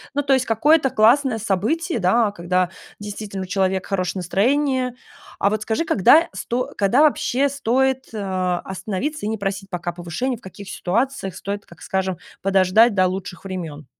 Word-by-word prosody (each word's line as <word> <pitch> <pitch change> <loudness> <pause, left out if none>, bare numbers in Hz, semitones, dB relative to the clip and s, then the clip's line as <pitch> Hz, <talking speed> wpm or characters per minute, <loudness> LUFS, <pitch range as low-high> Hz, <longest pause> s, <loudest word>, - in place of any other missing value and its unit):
Ну, 285 - +1
то 270 -1 +3
есть 260 -1 +2
какое-то 275 +6 +3
классное 245 +2 +3
событие, 225 - -1
да, 205 +4 +3
когда 180 -1 0 0.3
действительно 205 -1 -6
у - - -5
человека 190 0 -1
хорошее 185 -1 -1
настроение. 255 - +1 0.4
А 200 - +2
вот 215 0 -1
скажи, 220 +9 -1
когда 320 - +5
сто 250 +2 -3
когда, 205 +7 +3
вообще, 295 -3 +2
стоит, 265 0 0
а, 185 -4 -1
остановиться 200 +9 -4
и - - -1
не 220 - -2
просить 195 0 -4
пока 175 -1 -3
повышение, 175 +9 -3
в - - -21
каких 195 0 -11
ситуациях 200 -1 -2
стоит, 200 +1 -5
как 170 - -17
скажем, 190 -1 -2 0.2
подождать 195 +4 +4
до 185 - +4
лучших 185 0 -6
времен. 165 -6 -6
205 Hz, 165 wpm, -21 LUFS, 185-255 Hz, 0.4 s, когда